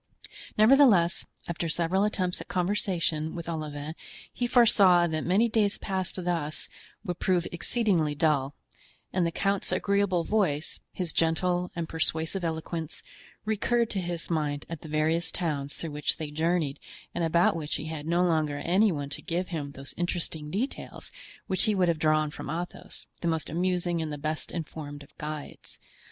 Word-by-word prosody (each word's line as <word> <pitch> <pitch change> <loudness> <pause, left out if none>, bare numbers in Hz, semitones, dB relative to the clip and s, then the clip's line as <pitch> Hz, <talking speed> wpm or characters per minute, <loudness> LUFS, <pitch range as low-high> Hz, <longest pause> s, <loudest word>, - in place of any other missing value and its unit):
Nevertheless, 215 -7 +5 0.2
after 170 0 -2
several 175 +5 +2
attempts 185 -4 -1
at - - -8
conversation 175 -4 0
with 170 -1 -6
Olivain 155 -2 -4 0.4
he 245 - -1
foresaw 200 -8 +6
that 160 -2 -1
many 200 +7 +3
days 215 -3 +2
passed 190 -2 -2
thus 155 -5 -2 0.4
would 180 0 -3
prove 180 -2 +2
exceedingly 175 -5 +1
dull; 145 -2 +1 0.6
and 180 -2 +2
the - - -1
count's 195 +1 0
agreeable 195 -1 +2
voice, 175 -7 0
his 180 -3 -3
gentle 175 +2 +1
and 170 -2 -2
persuasive 160 +3 -1
eloquence, 160 -1 -4 0.4
recurred 230 +2 +1
to 195 - 0
his 175 -1 -4
mind 150 -3 -1
at 165 -2 -6
the - - -9
various 160 +2 +1
towns 145 -5 -2
through 165 - -5
which 150 0 0
they 155 -2 -5
journeyed 160 -2 0 0.3
and 170 - -1
about 170 +1 +3
which 155 -2 -2
he 150 - -4
had 155 -1 -5
no 170 +2 +3
longer 155 -4 +1
any 190 +7 +3
one 145 -3 -3
to 140 - -2
give 175 +2 -2
him 150 -5 -3
those 135 +1 -8
interesting 170 -3 -1
details 220 - -4 0.3
which 190 - +3
he 215 - +2
would 180 -2 +3
have 165 -2 +1
drawn 155 -1 +2
from - - -7
Athos, 175 +3 -5
the 170 - -2
most 160 -3 -1
amusing 175 0 0
and 155 -1 -3
the 150 - -4
best 155 +2 -3
informed 150 -3 -6
of 155 +2 -20
guides. 150 -1 -6
170 Hz, 165 wpm, -28 LUFS, 155-185 Hz, 0.6 s, foresaw